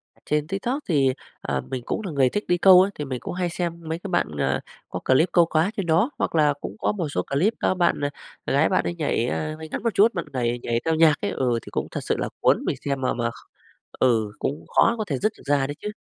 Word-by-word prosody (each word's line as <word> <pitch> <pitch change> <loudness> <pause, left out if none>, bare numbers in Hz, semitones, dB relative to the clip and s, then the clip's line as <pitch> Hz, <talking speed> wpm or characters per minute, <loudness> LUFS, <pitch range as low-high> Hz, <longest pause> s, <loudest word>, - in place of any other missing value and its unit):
À, - - -28
trên 150 0 0
TikTok 235 - -2
thì, 135 -5 +3 0.3
à, 70 -1 -2
mình 125 -2 -3
cũng - - -2
là 185 - -3
người 135 -3 +3
thích 205 - -2
đi 175 0 +2
câu 185 0 +8
ấy, 200 - +1
thì 150 - -5
mình 130 -3 -4
cũng - - -5
hay 180 -1 -1
xem 170 -1 -3
mấy 160 +1 -2
cái 195 - -7
bạn, 175 -1 +1
à, 70 -1 +1 0.3
có - - -5
clip 130 +7 +4
câu 170 -2 +5
cá 165 +5 +1
trên 195 -4 -2
đó, 170 - +3
hoặc - - -1
là 150 -2 +4
cũng - - -6
có - - 0
một 175 -7 -3
số - - -1
clip 180 +12 +1
các - - +2
bạn, 175 -4 +1
à, 145 - 0 0.4
gái 145 +3 +3
bạn 185 - +1
ấy 175 - -2
nhảy, 145 -7 0
à, 155 +4 -2
váy 160 0 -8
ngắn - - -4
một 230 -4 0
chút, 220 +4 +4
bạn 170 - -2
nẩy 120 -1 -1
nhảy 115 0 0
theo 160 - +2
nhạc 160 -1 +5
ấy, 205 - -1
ừ, 125 -3 0
thì - - -11
cũng - - -2
thật - - -4
sự - - 0
là - - -2
cuốn - - +3
mình - - -1
xem 140 -2 -1
mà 130 - 0
mà 120 -1 -1
kh 115 - -15 0.5
ừ, 110 -5 +2
cũng 145 - -3
khó 230 - +5
có 215 - -1
thể 140 -5 -2
dứt 215 +1 +1
được - - -16
ra 140 -1 +2
đấy 145 - -5
chứ. 210 - -3
160 Hz, 280 wpm, -24 LUFS, 135-185 Hz, 0.5 s, câu